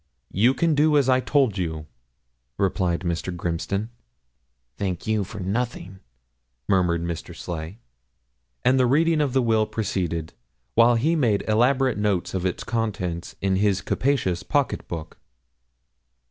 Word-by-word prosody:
'You 120 +7 +3
can 165 +3 +2
do 150 +1 +4
as 140 -3 +3
I 130 -1 +4
told 130 -7 +1
you,' 80 -3 -3 0.7
replied 90 -3 0
Mr. 85 0 -2
Grimston. 90 +5 -3 0.9
'Thank 95 -4 -3
you 110 -2 +1
for 105 +2 -8
nothing,' 100 -1 -3 0.7
murmured 90 -3 +2
Mr. 85 -1 -5
Sleigh. 80 +3 -6 0.9
And 130 +1 +4
the 125 - +4
reading 155 +4 +3
of 140 -4 0
the 130 -1 +3
will 110 -2 +2
proceeded, 85 -6 -2 0.4
while 120 - +5
he 150 +9 +2
made 115 -10 +1
elaborate 125 +3 +2
notes 100 -4 0
of 95 -1 0
its 90 - -4
contents 100 -7 -3
in 95 -1 +1
his 100 -2 +2
capacious 120 -10 0
pocket 145 +6 -1
book. 80 -2 -7
105 Hz, 135 wpm, -24 LUFS, 90-125 Hz, 0.9 s, while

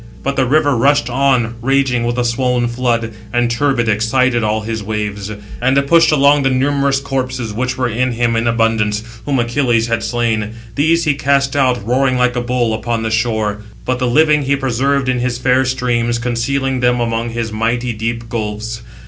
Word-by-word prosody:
But 140 - 0
he 140 - -9
(the 130 -2 +2
River) 145 0 +2
rushed 130 0 +2
on, 130 -3 +1
raging 130 -1 +1
with 120 +1 -2
a 125 - 0
swoln 120 0 0
flood, 120 -2 -1 0.2
and, 120 0 +1
turbid, 120 -1 0
excited 120 +3 +1
all 110 +1 0
his 110 0 -4
waves. 105 -1 -4 0.3
And 130 +2 +2
it 140 - +2
pushed 165 +3 +4
along 145 0 +4
the 135 - +2
numerous 140 +1 +1
corpses, 130 -4 -3
which 125 +3 -2
were 130 -1 0
in 125 +2 -1
him 120 0 0
680 115 - 0
in 115 - -1
abundance, 115 -2 +1 0.2
whom 140 -2 +1
Achilles 120 -1 +1
had 115 0 0
slain. 115 -2 -1 0.2
These 165 +4 +2
he 150 - +2
cast 140 0 +1
out, 125 -6 +1
roaring 130 +2 +1
like 125 0 +1
a 120 - 0
bull, 120 -2 0
upon 115 +1 -2
the 110 - -2
shore; 110 -2 -1 0.2
but 130 0 -1
the 125 - 0
living 150 +4 +3
he 140 0 +1
preserved 135 +1 0
in 125 -1 +1
his 120 -1 -1
fair 125 +1 +2
streams, 120 -2 0
concealing 125 +3 -1
them 125 0 +2
among 115 0 -1
his 115 -1 -4
mighty 120 +2 -1
deep 115 +1 -4
gulfs. 115 0 -4
120 Hz, 195 wpm, -16 LUFS, 115-135 Hz, 0.3 s, pushed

